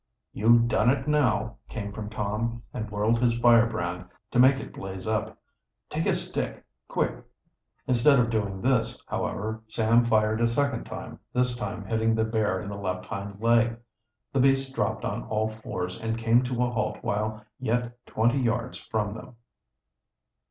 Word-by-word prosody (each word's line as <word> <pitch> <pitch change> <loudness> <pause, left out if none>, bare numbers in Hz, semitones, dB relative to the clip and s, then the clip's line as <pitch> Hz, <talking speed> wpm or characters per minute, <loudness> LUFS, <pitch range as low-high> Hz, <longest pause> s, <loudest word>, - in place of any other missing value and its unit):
"You've 115 +2 +5
done 120 0 +3
it 135 +1 +1
now," 120 -7 +1
came 100 -4 -5
from 105 0 -6
Tom, 110 +2 -2
and 110 -1 -4
whirled 105 +3 +1
his 120 -1 +3
firebrand, 115 -7 +3 0.3
to 125 - +2
make 130 +2 +7
it - - -8
blaze 95 -1 -7
up. 110 0 -1 0.5
"Take - - -1
a - - +3
stick, - - -4 0.2
quick!" - - -1 0.6
Instead 130 +3 +5
of 120 -1 +2
doing 100 -4 -2
this, 120 -2 +1
however, 110 +2 -3
Sam 115 +2 +3
fired 110 -1 +2
a 115 - +4
second 135 +1 0
time, - - -8
this 125 0 +2
time 105 -3 -4
hitting 110 +2 +1
the 110 - +2
bear 110 -4 0
in 100 - -6
the 100 0 -6
left 90 -2 -3
hind 100 0 -6
leg. 115 0 +3 0.6
The 135 - +2
beast 135 0 +3
dropped - - -1
on - - -2
all 110 0 0
fours 95 -4 -5
and 115 0 -1
came 115 +1 +4
to 125 -1 0
a 125 - 0
halt 120 - -1
while 110 +1 -2
yet 120 0 -2
twenty 120 +5 +2
yards 120 0 -1
from 105 -2 -2
them. 115 +2 -10
115 Hz, 165 wpm, -27 LUFS, 105-120 Hz, 0.6 s, make